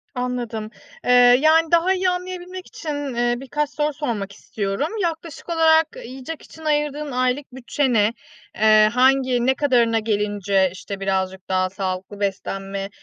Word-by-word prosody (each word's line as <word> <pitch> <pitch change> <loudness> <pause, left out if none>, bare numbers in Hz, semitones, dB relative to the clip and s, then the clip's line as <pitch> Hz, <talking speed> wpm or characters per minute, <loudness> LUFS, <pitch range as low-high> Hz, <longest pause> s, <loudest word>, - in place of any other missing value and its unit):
Anladım. 240 -3 -3 0.4
Eee, - - +2 0.3
yani, 320 +1 +4
daha 340 +3 +4
iyi 370 0 +1
anlayabilmek 365 0 -5
için, 290 -4 -5
eee, 240 0 +1
birkaç 290 +2 -2
soru 295 +1 -1
sormak 230 -9 -3
istiyorum. 200 +5 -3
Yaklaşık 330 -1 -4
olarak 320 -1 +4 0.2
yiyecek 265 +6 -8
için 320 0 -14
ayırdığın 295 -1 -1
aylık 255 +3 -1
bütçe 265 +1 -1
ne? 215 0 +3 0.4
Iıı, 215 0 +5
hangi, 255 0 +3
ne 265 +1 +3
kadarına 240 -6 +2
gelince, 205 -3 +1
işte, 195 +1 -7
birazcık 190 -1 -2
daha 185 0 +1
sağlıklı 190 +1 -5
beslenme, 195 0 -3
250 Hz, 140 wpm, -22 LUFS, 205-300 Hz, 0.4 s, Iıı